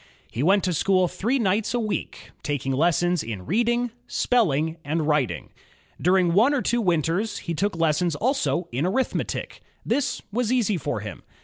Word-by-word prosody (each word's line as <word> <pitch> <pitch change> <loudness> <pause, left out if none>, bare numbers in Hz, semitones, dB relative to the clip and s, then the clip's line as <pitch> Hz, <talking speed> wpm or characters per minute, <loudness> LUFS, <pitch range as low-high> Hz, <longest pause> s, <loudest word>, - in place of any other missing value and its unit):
He 115 - -3
went 195 +6 +4
to 180 - 0
school 185 +2 +2
three 230 +10 -1
nights 215 0 0
a - - +1
week, 215 -3 -4
taking 140 -2 -2
lessons 175 +4 +2
in 105 -5 -6
reading, 240 - +1 0.2
spelling, 160 - +1
and 155 +1 -1
writing. 150 -6 0 0.5
During 180 -1 +3
one 235 +10 +4
or 260 - 0
two 240 0 +1
winters, 175 +3 0
he 170 - -4
took 200 +4 -1
lessons 165 0 +1
also 250 - 0
in 135 +8 0
arithmetic. 255 +7 -2 0.2
This 280 -1 -1
was 240 +1 0
easy 220 -6 +2
for 160 - -3
him. - - -7
185 Hz, 165 wpm, -24 LUFS, 160-225 Hz, 0.5 s, went